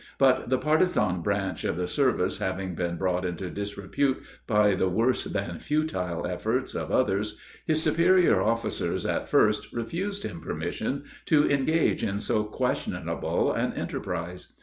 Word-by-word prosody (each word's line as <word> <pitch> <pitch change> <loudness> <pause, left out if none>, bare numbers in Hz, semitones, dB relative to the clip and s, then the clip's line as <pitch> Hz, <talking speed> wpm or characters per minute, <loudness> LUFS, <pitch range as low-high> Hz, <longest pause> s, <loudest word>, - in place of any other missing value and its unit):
But 130 -2 +3
the 130 - +3
partizan 150 - +2
branch 100 -2 -1
of - - -1
the 90 0 -1
service 125 -7 +1
having 95 0 -2
been 85 0 -2
brought 90 0 0
into 90 0 -3
disrepute 100 +7 -1 0.3
by 105 -3 +4
the 95 0 +1
worse 115 +7 +1
than 85 -5 -3
futile 140 - -1
efforts 110 +9 -1
of - - -3
others, 105 -3 +1 0.3
his 155 0 +1
superior 170 +3 +4
officers 115 +1 -1
at - - -1
first 105 0 +3
refused 190 - -3
him 85 - -5
permission 135 - -3 0.2
to 150 -2 +5
engage 145 +3 +2
in 100 0 -1
so 105 0 0
questionable 105 - -1
an - - 0
enterprise. 90 0 -5
105 Hz, 145 wpm, -27 LUFS, 90-140 Hz, 0.3 s, to